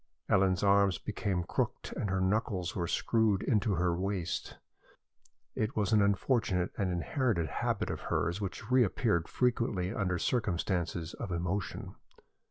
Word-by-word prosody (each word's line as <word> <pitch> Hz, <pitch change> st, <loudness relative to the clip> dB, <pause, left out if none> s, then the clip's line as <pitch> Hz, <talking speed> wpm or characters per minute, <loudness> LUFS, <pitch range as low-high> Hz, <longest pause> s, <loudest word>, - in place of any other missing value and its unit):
Ellen's 95 Hz, -1 st, +3 dB
arms 100 Hz, -3 st, +4 dB
became 90 Hz, +1 st, -2 dB
crooked -, -, -2 dB
and 100 Hz, -, -2 dB
her 95 Hz, 0 st, 0 dB
knuckles 95 Hz, -2 st, 0 dB
were 85 Hz, -2 st, -1 dB
screwed 110 Hz, -2 st, +2 dB
into 105 Hz, -4 st, +2 dB
her 85 Hz, 0 st, +1 dB
waist. 95 Hz, -2 st, -3 dB, 1.0 s
It 110 Hz, +4 st, -2 dB
was 105 Hz, -1 st, +1 dB
an 105 Hz, -, +5 dB
unfortunate 100 Hz, -2 st, +1 dB
and 95 Hz, -2 st, 0 dB
inherited 90 Hz, -, 0 dB
habit -, -, -1 dB
of -, -, -5 dB
hers, 85 Hz, +5 st, -1 dB
which 105 Hz, +4 st, -5 dB
reappeared 115 Hz, -, +2 dB
frequently 115 Hz, -6 st, 0 dB
under 90 Hz, -5 st, 0 dB
circumstances 90 Hz, -6 st, -1 dB
of 95 Hz, -, -6 dB
emotion. 90 Hz, +3 st, -3 dB
95 Hz, 135 wpm, -31 LUFS, 90-110 Hz, 1.0 s, an